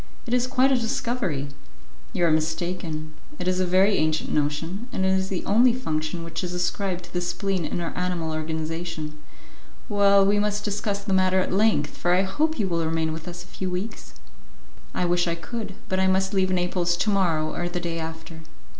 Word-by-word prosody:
It 240 - -3
is 250 0 +3
quite 265 +1 +3
a - - +5
discovery." 230 - -1 0.6
"You 175 - +1
are 165 - +4
mistaken; 160 0 -1 0.2
it 180 - -3
is 185 0 +2
a 185 - +1
very 190 +3 +4
ancient 155 0 0
notion, 160 +9 -1
and 190 - 0
it - - +3
is 190 0 +1
the 185 - -3
only 235 +4 +5
function 160 -8 -2
which 165 +3 -4
is 180 0 -3
ascribed 180 0 -1
to 175 - -14
the 175 - 0
spleen 180 0 -1
in - - -2
our 170 -1 -4
animal 180 -3 -1
organization." 160 0 -4 0.7
"Well, 200 -2 +5
we 205 +1 +3
must 210 0 0
discuss 205 -1 -1
the 200 -1 -1
matter 185 0 +4
at 185 - 0
length, 205 -7 +2
for 175 0 +2
I 185 - +3
hope 310 +12 0
you 210 -5 +1
will 170 -2 0
remain 160 0 0
with 160 +1 -7
us 175 0 -6
a - - -18
few 185 +1 -4
weeks." 185 - -5 0.8
"I 180 - +1
wish 175 0 +2
I 170 - 0
could, 200 +4 -6
but 185 - 0
I 190 - +3
must 190 +1 +2
leave 190 -1 +2
Naples 180 -1 +1
to 215 - +1
morrow 165 -6 +1
or 175 0 -2
the 175 0 -2
day 170 -1 -3
after." 160 0 -7
180 Hz, 205 wpm, -25 LUFS, 165-200 Hz, 0.8 s, a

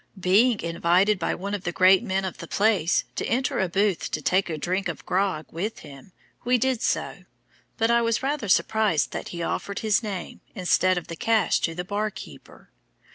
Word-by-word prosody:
Being 205 +6 +3
invited 175 +4 +2
by - - -1
one 200 +3 -5
of 200 -2 -3
the 175 - -2
great 185 +2 +5
men 195 -4 -1
of 185 - -6
the 170 - -8
place 200 -5 +2
to - - -2
enter 260 +3 0
a 190 -2 0
booth 200 0 0
to - - -2
take 185 +5 +1
a 160 - -3
drink 185 +6 -2
of - - -6
grog 185 -4 0
with 200 +7 -4
him, 140 +6 -13 0.3
we 250 +1 +3
did 255 -1 0
so; - - -2 0.5
but 225 +1 +2
I 235 0 +4
was 230 +1 0
rather 275 -6 -2
surprised 205 -5 +2
that - - -5
he 170 -1 -5
offered 200 +3 -3
his 215 -1 +2
name, 200 -5 -6
instead 185 -1 +2
of 175 - -4
the 165 - -7
cash 225 +5 +2
to 165 - -2
the 180 +1 -4
bar 210 +3 -1
keeper. 210 - -13
195 Hz, 200 wpm, -25 LUFS, 175-220 Hz, 0.5 s, great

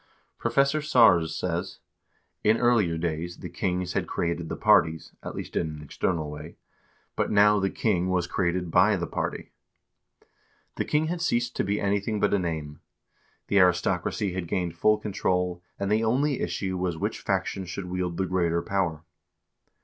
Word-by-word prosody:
Professor 140 +6 +2
Sars 100 - +4
says: 90 +1 -3 0.3
" - - -44
In 110 +2 +4
earlier 110 -9 +2
days 85 +1 -3
the - - -7
kings 90 -1 -2
had - - -1
created 85 -1 -2
the - - -3
parties, 80 -1 +3
at - - -7
least - - -7
in 85 - +1
an - - -10
external 75 +1 -2
way, 75 +3 -9 0.6
but - - 0
now 105 0 +5
the 95 0 +1
king 95 -5 0
was 90 -1 +1
created 90 -1 -1
by - - +5
the - - -2
party.2 - - -8 0.5
The - - -1
king 150 +1 +1
had 170 +1 -3
ceased 120 -7 0
to - - +1
be 100 +2 -1
anything 100 +2 0
but 100 0 +2
a 100 - +3
name. 80 -4 -4 0.7
The 100 - +3
aristocracy 90 +2 +1
had 90 -2 -4
gained 85 -1 -2
full 105 +5 +3
control, 90 -4 -1 0.2
and 100 +1 -2
the 110 +1 +2
only 135 +5 +1
issue 95 -2 -2
was 90 -2 -1
which - - -2
faction 95 - -1
should 90 +2 -5
wield 90 -1 -3
the 95 - 0
greater 85 -2 0
power." 90 -5 -1
90 Hz, 170 wpm, -26 LUFS, 85-105 Hz, 0.7 s, now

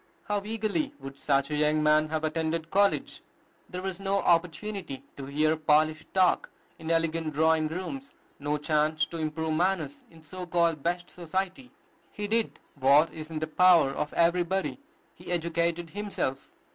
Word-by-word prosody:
How 205 -1 -1
eagerly 225 +7 -2
would 135 0 -9
such 140 0 +1
a - - 0
young 150 +1 +2
man 155 0 +4
have 160 0 -2
attended 160 +1 -2
college! 200 +1 +1 0.5
There 180 0 -5
was 190 -1 -3
no 195 0 0
opportunity 175 -2 0
to 135 -1 -7
hear 155 +3 +2
polished 155 0 +2
talk 185 -2 +3 0.3
in 160 0 -6
elegant 165 -1 +1
drawing 160 0 +3
rooms, 190 - -6 0.2
no 145 +1 -1
chance 155 +1 +1
to 165 0 -7
improve 160 0 -2
manners 165 -4 0
in 165 -2 -17
so 180 +4 -7
called 170 -3 +1
"best 175 +3 -2
society." 190 +8 -4 0.4
He 205 - -5
did 225 +2 0 0.2
what 140 +3 +4
is 155 0 -8
in 160 - -5
the 155 - -1
power 170 -2 +5
of 150 +2 -3
everybody, 175 +5 +1 0.3
he - - -10
educated 170 0 -1
himself. 200 -9 -3
165 Hz, 160 wpm, -28 LUFS, 155-185 Hz, 0.5 s, power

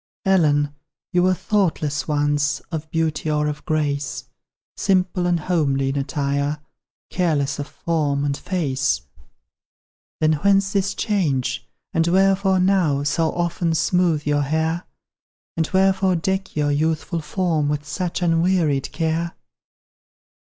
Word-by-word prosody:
Ellen, 150 -6 +3 0.4
you 180 - +4
were 185 +1 +3
thoughtless 170 -8 0
once 145 -1 +1
Of 160 -1 -4
beauty 160 -1 -1
or 150 0 +1
of 150 0 -3
grace, 145 -2 -1 0.5
Simple 185 -1 +1
and 175 -2 +1
homely 140 -6 +1
in 135 - -2
attire, 140 +1 -1 0.5
Careless 150 -6 0
of 145 - -4
form 145 -4 -1
and 140 -1 0
face; 135 - -1 1.2
Then 155 0 +3
whence 195 -1 +3
this 195 -1 0
change? 145 - -1 0.3
and 165 0 +2
wherefore 190 +1 +3
now 180 -7 +2
So 160 +2 +1
often 170 -1 -1
smoothe 170 -1 +1
your 145 0 +2
hair? 160 +4 -1 0.7
And 160 -2 0
wherefore 190 0 +3
deck 190 +3 -2
your 145 -1 +1
youthful 160 +3 0
form 160 -2 0
With 145 0 -2
such 180 0 -3
unwearied 165 -4 +1
care? 165 +1 -1
160 Hz, 125 wpm, -22 LUFS, 145-180 Hz, 1.2 s, you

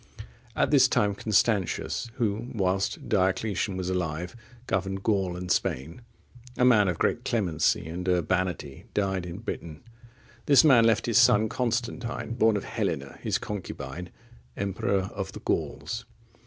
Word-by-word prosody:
At - - +1
this - - +6
time 105 -1 +2
Constantius, 105 +1 0
who, 115 -1 -1
whilst 95 -1 -1
Diocletian 100 -1 0
was 90 -1 -3
alive, 90 0 -2 0.3
governed 95 -1 -2
Gaul 95 -5 0
and 90 0 -4
Spain, 80 - -1 0.6
a 125 - +4
man 110 -5 +5
of 90 -3 -1
great 120 - 0
clemency 90 - +1
and 90 +3 -4
urbanity, 90 -3 -1
died 95 -3 0
in 85 +1 -6
Britain. 85 -8 -6 0.6
This 140 -3 +7
man 130 -7 +6
left 115 -1 +3
his 115 0 +4
son 115 -3 +5
Constantine,(59) 120 0 -2
born 110 -1 +4
of 100 - -4
Helena, 70 0 -3
his - - 0
concubine, 90 -5 -6 0.5
emperor 100 0 -1
of 95 -1 -5
the - - -7
Gauls. - - -3
95 Hz, 140 wpm, -27 LUFS, 90-110 Hz, 0.6 s, This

